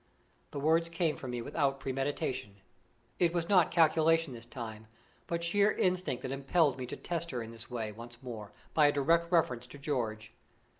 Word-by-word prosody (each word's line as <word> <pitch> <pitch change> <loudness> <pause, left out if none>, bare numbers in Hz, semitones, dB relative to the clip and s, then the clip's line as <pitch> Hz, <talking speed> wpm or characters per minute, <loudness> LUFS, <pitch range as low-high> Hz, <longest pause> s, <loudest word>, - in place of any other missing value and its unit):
The 145 - -5
words 165 +3 +3
came 165 -2 0
from 130 - -7
me 120 -1 -3
without 135 0 0
premeditation. 130 -5 -2 0.6
It 175 0 +3
was 170 -1 0
not 185 -4 +5
calculation 165 -2 +4
this 115 -1 -9
time, 110 -3 -7 0.4
but 170 0 -2
sheer 200 +5 +4
instinct 180 -8 0
that 130 - -3
impelled 135 +1 +2
me 125 - -4
to - - -5
test 170 -1 -3
her 125 -5 -3
in 115 - -8
this 115 0 -11
way, 115 -3 -3
once 120 +2 -10
more, 110 -5 -7 0.2
by 150 -2 +6
a - - +4
direct 165 +4 +2
reference 125 -8 +2
to 130 - -11
George. 115 -6 -3
140 Hz, 185 wpm, -32 LUFS, 120-165 Hz, 0.6 s, by